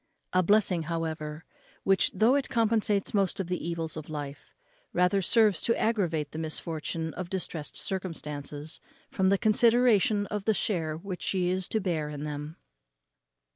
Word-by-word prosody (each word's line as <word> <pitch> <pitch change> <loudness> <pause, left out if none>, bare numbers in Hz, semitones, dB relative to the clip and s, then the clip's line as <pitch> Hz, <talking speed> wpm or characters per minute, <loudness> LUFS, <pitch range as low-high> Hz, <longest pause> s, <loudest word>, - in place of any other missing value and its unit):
A 185 - +5
blessing, 190 -2 +3
however, 160 -1 -3 0.4
which, 195 0 +3
though 225 +4 +4
it 280 -1 +1
compensates 225 -4 +1
most 195 -3 +1
of 195 - -1
the 180 -1 -3
evils 165 -2 -3
of 155 -1 -7
life, 145 -2 -7 0.4
rather 180 +2 +3
serves 210 -2 +4
to 230 - +1
aggravate 170 -10 0
the 155 - -5
misfortune 160 0 -3
of 180 -1 -5
distressed 175 -5 -3
circumstances, 150 -5 -4 0.3
from 190 0 +2
the 200 - +4
consideration 220 -1 +4
of 205 -1 -4
the 220 - +3
share 160 -8 -1
which 185 +1 -6
she 180 -2 0
is 185 0 0
to 220 - 0
bear 165 -6 -1
in 150 -1 -6
them. 150 +1 -5
180 Hz, 155 wpm, -28 LUFS, 160-205 Hz, 0.4 s, A